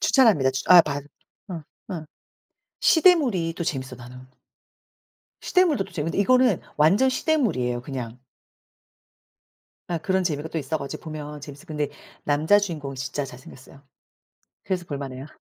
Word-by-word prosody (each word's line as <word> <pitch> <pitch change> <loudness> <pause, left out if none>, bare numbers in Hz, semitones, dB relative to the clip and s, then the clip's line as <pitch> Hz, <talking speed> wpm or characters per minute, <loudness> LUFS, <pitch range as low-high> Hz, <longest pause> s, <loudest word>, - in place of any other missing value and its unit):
추천합니다 210 - +4
추천 130 +7 +5
아 175 - +10
반 145 -2 -4 0.4
어 170 -4 -6 0.3
어 170 -6 -5 0.8
시대물이 275 - +4
또 - - -2
재밌어 130 -4 -3
나는. 125 +1 -11 1.2
시대물도 340 - +2
또 195 - -15
재밌는데 165 +1 -2
이거는 250 -1 +4 0.2
완전 190 - +4
시대물이에요 190 - 0
그냥. 125 -3 -6 1.7
예 170 - 0
그런 190 +3 0
재미가 155 -2 -2
또 160 - -3
있어 155 +2 -2
가지고 140 +4 -7
보면 150 -2 -7
재밌어. 145 0 -11
근데 150 -2 -2 0.4
남자 155 +7 +4
주인공이 155 -9 -4
진짜 140 +2 -3
잘 125 -2 -10
생겼어요 130 +1 -15 0.8
그래서 185 -2 -2
볼 145 - -4
만해요. 135 -1 -7
155 Hz, 320 characters per minute, -24 LUFS, 140-190 Hz, 1.7 s, 아